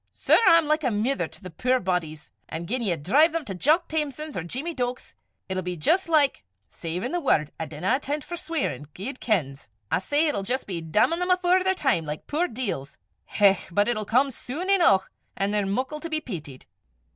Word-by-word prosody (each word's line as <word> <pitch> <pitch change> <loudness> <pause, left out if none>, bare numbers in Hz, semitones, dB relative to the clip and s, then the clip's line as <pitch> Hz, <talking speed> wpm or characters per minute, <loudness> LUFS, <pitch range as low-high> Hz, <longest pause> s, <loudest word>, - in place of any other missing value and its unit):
Sir, - - +3
I'm 335 -3 +7
like 305 +1 +1
a 255 - +2
mither 230 +5 0
to - - -14
the 185 - -8
puir 255 +9 +1
bodies! 160 - -3 0.2
An' 165 +1 -4
gien 250 +8 -2
ye 195 -7 +1
drive 280 - +3
them 330 -3 -2
to 195 - -4
Jock 310 - +2
Thamson's, 305 -1 -3
or - - -2
Jeemie 270 - -4
Deuk's, 250 -3 -4 0.3
it'll 185 0 -2
be 180 -1 -4
jist 335 - +2
like 295 -4 +3 0.2
savin' 175 - -4
the 350 - 0
word, 155 - +1
I 160 - -3
dinna 190 - 0
inten' 295 +2 -2
't - - -13
for 350 - -5
sweirin', 320 - -3
guid 250 +8 -6
kens! 140 - -1 0.2
I - - +3
say, 290 - +1
it'll 285 -9 -1
jist 250 +7 -2
be 175 -4 -4
dammin' 210 - +2
them 360 +1 -1
afore 365 0 +3
their 380 0 +2
time, 265 - +1
like 150 0 -5
the - - -21
puir 330 +5 +1
deils. 210 - -4 0.3
Hech! 195 -2 +2
but 205 +4 +2
it'll 225 -3 0
come 260 +6 +2
sune 310 +10 -4
eneuch, 330 - +4 0.3
an' 195 +1 +1
they're 205 -2 +1
muckle 260 +9 -2
to 335 - -6
be 310 -1 0
peetied!" 160 - -8
250 Hz, 215 wpm, -25 LUFS, 185-305 Hz, 0.3 s, I'm